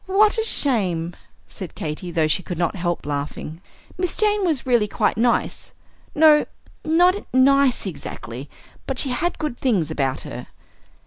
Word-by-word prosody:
"What 420 Hz, +4 st, +3 dB
a -, -, +1 dB
shame!" 185 Hz, -, 0 dB, 0.3 s
said 185 Hz, -4 st, -8 dB
Katy, 155 Hz, +3 st, -5 dB
though 165 Hz, -2 st, +1 dB
she 155 Hz, +4 st, +1 dB
could 180 Hz, -2 st, -6 dB
not 170 Hz, +2 st, 0 dB
help 175 Hz, -2 st, -2 dB
laughing. 150 Hz, +3 st, -5 dB, 0.4 s
"Miss 360 Hz, -2 st, -1 dB
Jane 420 Hz, -1 st, +2 dB
was 315 Hz, -8 st, 0 dB
really 240 Hz, -5 st, +3 dB
quite -, -, 0 dB
nice, 235 Hz, +2 st, 0 dB, 0.4 s
no, 305 Hz, -1 st, +6 dB, 0.4 s
not 350 Hz, +4 st, +4 dB, 0.2 s
nice 270 Hz, -1 st, +4 dB
exactly, 135 Hz, -, -7 dB, 0.4 s
but 265 Hz, -, -3 dB
she 270 Hz, -, +3 dB
had 330 Hz, +8 st, -1 dB
good 300 Hz, -6 st, -4 dB
things 190 Hz, -, +1 dB
about 135 Hz, -4 st, -1 dB
her." -, -, -8 dB
235 Hz, 150 wpm, -22 LUFS, -, 0.4 s, no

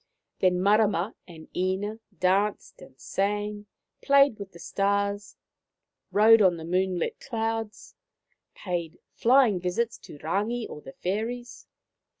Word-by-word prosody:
Then 180 Hz, -1 st, +3 dB
Marama 205 Hz, -1 st, +3 dB
and 160 Hz, -3 st, -12 dB
Ina 190 Hz, +4 st, -1 dB, 0.2 s
danced 195 Hz, +3 st, 0 dB
and 130 Hz, 0 st, -15 dB
sang, 205 Hz, +1 st, -2 dB, 0.3 s
played 280 Hz, -5 st, +4 dB
with 200 Hz, -1 st, -8 dB
the 170 Hz, -, -13 dB
stars, 200 Hz, +2 st, -1 dB, 0.8 s
rode 220 Hz, +2 st, +6 dB
on 180 Hz, -3 st, +4 dB
the 160 Hz, -, -8 dB
moonlit 180 Hz, 0 st, -1 dB
clouds, 225 Hz, -3 st, -4 dB, 0.6 s
paid 175 Hz, -4 st, -4 dB, 0.2 s
flying 240 Hz, -5 st, +4 dB
visits 185 Hz, +6 st, -2 dB
to -, -, -12 dB
Rangi 210 Hz, +10 st, -2 dB
or 150 Hz, -, -9 dB
the 135 Hz, -, -11 dB
fairies. 230 Hz, +6 st, -4 dB
200 Hz, 120 wpm, -27 LUFS, 180-220 Hz, 0.8 s, rode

